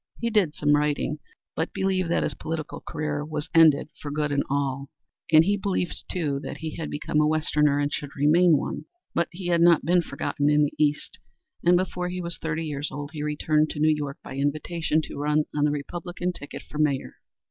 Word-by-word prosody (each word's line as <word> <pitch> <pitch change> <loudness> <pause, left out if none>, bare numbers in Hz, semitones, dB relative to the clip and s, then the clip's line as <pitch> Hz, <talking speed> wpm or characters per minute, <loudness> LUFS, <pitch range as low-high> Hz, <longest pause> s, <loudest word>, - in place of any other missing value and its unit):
He 235 0 -1
did 195 -9 +2
some 145 0 +3
writing, 150 0 0 0.4
but 160 - -2
believed 190 -2 0
that 170 - +2
his - - -1
political 155 -2 -5
career 150 -1 -3
was 150 -1 -5
ended 160 -3 +5
for 145 - -5
good 150 0 -1
and 140 -1 +2
all, 140 -1 -1 0.4
and 160 0 +7
he 205 +2 +2
believed 190 -3 -2
too 150 -6 -1
that - - -6
he 160 -1 -5
had 160 - -4
become 150 +1 0
a 150 - +3
Westerner 150 -2 +2
and 145 0 0
should 145 -1 -5
remain 155 +3 +5
one. - - -4 0.3
But 170 - +1
he 175 0 -5
had 170 -1 +3
not 170 -4 +5
been 175 +2 +4
forgotten 145 -1 -1
in 150 0 +4
the 145 - 0
East, 150 -1 0 0.4
and 175 +1 +5
before 180 -1 -2
he 180 0 -4
was 170 -2 -4
thirty 160 0 -2
years 145 -1 -3
old 145 +1 -6
he 150 - -5
returned 150 +1 +1
to 150 - -5
New 155 +1 +4
York 145 -2 -4
by 135 - -8
invitation 155 +3 0
to - - -7
run 150 +1 +2
on 150 0 +2
the 150 - +2
Republican 175 +5 -4
ticket 145 - -8
for 150 - -8
Mayor. 140 -3 0
150 Hz, 210 wpm, -25 LUFS, 145-170 Hz, 0.4 s, and